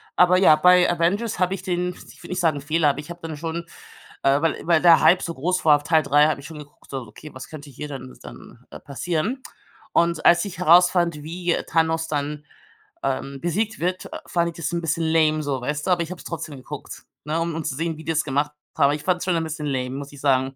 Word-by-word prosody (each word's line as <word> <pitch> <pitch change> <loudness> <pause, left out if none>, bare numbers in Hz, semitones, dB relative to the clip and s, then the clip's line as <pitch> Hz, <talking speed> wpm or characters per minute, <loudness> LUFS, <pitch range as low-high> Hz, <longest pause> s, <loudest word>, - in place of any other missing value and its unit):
Aber 180 0 +5
ja, 185 -5 +6
bei 180 +3 +5
Avengers 185 +7 0
habe 180 0 +1
ich 195 - -5
den 180 -1 -1
ich - - -15
würde - - -11
nicht 180 - -2
sagen 160 -5 +1
Fehler, 155 +1 +2
aber 140 - -2
ich 150 - -9
habe 170 - -9
dann 160 -2 -6
schon 165 +2 -4 0.6
äh, 140 +1 +3
weil 165 -1 -1
weil 170 -2 +4
der 170 -2 +7
Hype 180 - +5
so 170 - -3
groß 180 +6 -2
war 150 -2 +7
auf 145 - -12
Teil 155 +1 +3
3, 145 +2 +4
habe 155 - -1
ich - - -13
schon 160 -2 -9
geguckt 145 0 -15
so: 135 -1 -3
Okay, 150 +5 -12
was 130 - -10
könnte 150 -2 -10
hier 150 +3 -7
dann 130 -2 -8
dann, - - -13
äh, - - -9
passieren? 170 - -3 0.5
Und 170 -1 +2
als 175 +2 +5
ich 185 -4 -8
herausfand, 175 -2 +4
wie 175 +2 -2
Thanos 165 0 +1
dann, 150 0 -3 0.6
ähm, 135 0 -3
besiegt 210 +6 -1
wird, 180 +2 -2 0.2
fand 170 -1 0
ich 165 - -11
das 170 -2 -3
'n 170 - -1
bisschen 165 0 -1
lame 155 -1 +3
so, 140 -2 -2
weißt 150 +5 -3
du? - - +2
Aber 175 -1 +3
ich 165 - -8
habe 185 - -7
es - - -13
trotzdem 155 -3 -6
geguckt, 130 - -9 0.2
ne, 155 +2 -1
um 165 -1 -2
um 165 - -3
zu 140 - -2
sehen, 165 +1 -3
wie 160 - -10
die 165 - -1
das 160 -1 +1
gemacht 145 +1 -1 0.2
haben. - - +2
Aber 140 - +3
ich 150 - -8
fand's 180 -1 0
schon 180 -2 +1
'n 165 - 0
bisschen 160 -1 -5
lame, 130 -2 -2
muss 140 0 -7
ich 140 - -12
sagen. 135 -1 +1
160 Hz, 250 wpm, -23 LUFS, 145-175 Hz, 0.6 s, der